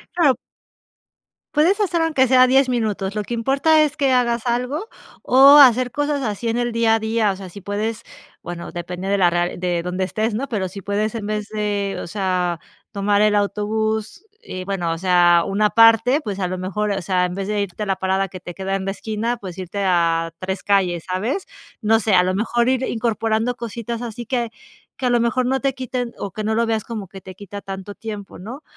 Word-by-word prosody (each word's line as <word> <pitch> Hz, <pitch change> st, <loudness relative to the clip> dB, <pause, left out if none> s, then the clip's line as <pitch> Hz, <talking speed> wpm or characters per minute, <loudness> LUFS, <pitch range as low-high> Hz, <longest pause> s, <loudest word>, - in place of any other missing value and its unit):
Claro. 300 Hz, -7 st, +4 dB, 1.2 s
Puedes 340 Hz, +7 st, +3 dB
hacer 360 Hz, -5 st, +1 dB
aunque 310 Hz, -5 st, +2 dB
sea 255 Hz, 0 st, +6 dB
10 270 Hz, +1 st, +4 dB
minutos. 215 Hz, -6 st, -1 dB
Lo 210 Hz, -, -2 dB
que 235 Hz, +4 st, -4 dB
importa 275 Hz, +6 st, +3 dB
es 300 Hz, -, -1 dB
que 275 Hz, -3 st, +1 dB
hagas 240 Hz, -1 st, +1 dB
algo, 250 Hz, -, -1 dB, 0.3 s
o 275 Hz, +3 st, +7 dB
hacer 255 Hz, -3 st, +6 dB
cosas 290 Hz, -1 st, -1 dB
así 215 Hz, 0 st, -3 dB
en 230 Hz, -, 0 dB
el 240 Hz, 0 st, 0 dB
día 230 Hz, -1 st, +3 dB
a 225 Hz, -, 0 dB
día. 220 Hz, -1 st, +1 dB
O -, -, -4 dB
sea, 190 Hz, 0 st, -9 dB
si 200 Hz, +2 st, -11 dB
puedes 210 Hz, +3 st, -3 dB, 0.4 s
bueno, 175 Hz, 0 st, -7 dB
depende 180 Hz, +2 st, -6 dB
de 200 Hz, 0 st, +1 dB
la 180 Hz, -, +5 dB
r 175 Hz, 0 st, 0 dB
de 175 Hz, -1 st, -1 dB
donde 180 Hz, +1 st, -2 dB
estés, 215 Hz, +4 st, -1 dB
¿no?, 260 Hz, +6 st, -3 dB
pero 200 Hz, -5 st, -1 dB
si 195 Hz, +2 st, -9 dB
puedes 205 Hz, +3 st, -1 dB
en 220 Hz, -3 st, -4 dB
vez 210 Hz, -1 st, -3 dB
de, 205 Hz, -2 st, -2 dB
o -, -, -7 dB
sea, 180 Hz, -3 st, -1 dB, 0.3 s
tomar 205 Hz, -1 st, +1 dB
el 210 Hz, 0 st, +4 dB
autobús 215 Hz, -, -1 dB, 0.2 s
eh, 185 Hz, -, -6 dB
bueno, 180 Hz, -4 st, -2 dB
o 165 Hz, -, -2 dB
sea, 175 Hz, -1 st, +4 dB
una 210 Hz, +2 st, +2 dB
parte, 230 Hz, +4 st, +5 dB
pues, 205 Hz, -9 st, -5 dB
a 180 Hz, -, 0 dB
lo 185 Hz, -, -3 dB
mejor, 200 Hz, +3 st, -2 dB
o 195 Hz, -1 st, -2 dB
sea, 180 Hz, +1 st, +1 dB
en 180 Hz, 0 st, -1 dB
vez 195 Hz, +1 st, -4 dB
de 210 Hz, -1 st, 0 dB
irte 200 Hz, +1 st, -4 dB
a -, -, -3 dB
la 195 Hz, -1 st, 0 dB
parada 190 Hz, +1 st, 0 dB
que 185 Hz, 0 st, -10 dB
te 175 Hz, -, -8 dB
queda 195 Hz, +2 st, -3 dB
en 195 Hz, -, -3 dB
la 195 Hz, -, -2 dB
esquina, 220 Hz, +4 st, -3 dB
pues, 185 Hz, -5 st, -9 dB
irte 185 Hz, +1 st, -5 dB
a 165 Hz, -2 st, +1 dB
3 190 Hz, 0 st, -4 dB
calles, 185 Hz, -4 st, +1 dB
¿sabes? 220 Hz, -, -2 dB, 0.4 s
No 225 Hz, 0 st, +3 dB
sé, 215 Hz, -1 st, +1 dB
a 180 Hz, -1 st, +6 dB
lo 185 Hz, +1 st, 0 dB
mejor 235 Hz, +3 st, +1 dB
ir 260 Hz, 0 st, +1 dB
incorporando 225 Hz, 0 st, 0 dB
cositas 235 Hz, 0 st, -5 dB
así 240 Hz, 0 st, -6 dB
que, 235 Hz, -1 st, -2 dB, 0.5 s
que 260 Hz, -, -3 dB
a -, -, +3 dB
lo 240 Hz, -1 st, +3 dB
mejor 240 Hz, +2 st, +1 dB
no 265 Hz, +1 st, 0 dB
te 275 Hz, -1 st, +1 dB
quiten 250 Hz, -2 st, -4 dB
o 200 Hz, -, -5 dB
que 215 Hz, -, -5 dB
no 220 Hz, +1 st, 0 dB
lo 230 Hz, +1 st, +2 dB
veas 220 Hz, -2 st, -1 dB
como 220 Hz, -4 st, -6 dB
que 190 Hz, +1 st, -11 dB
te 185 Hz, 0 st, -11 dB
quita 200 Hz, +1 st, -9 dB
tanto 195 Hz, +1 st, -7 dB
tiempo, 210 Hz, -3 st, -8 dB
¿no? 245 Hz, -, -9 dB
210 Hz, 225 wpm, -21 LUFS, 190-240 Hz, 1.2 s, o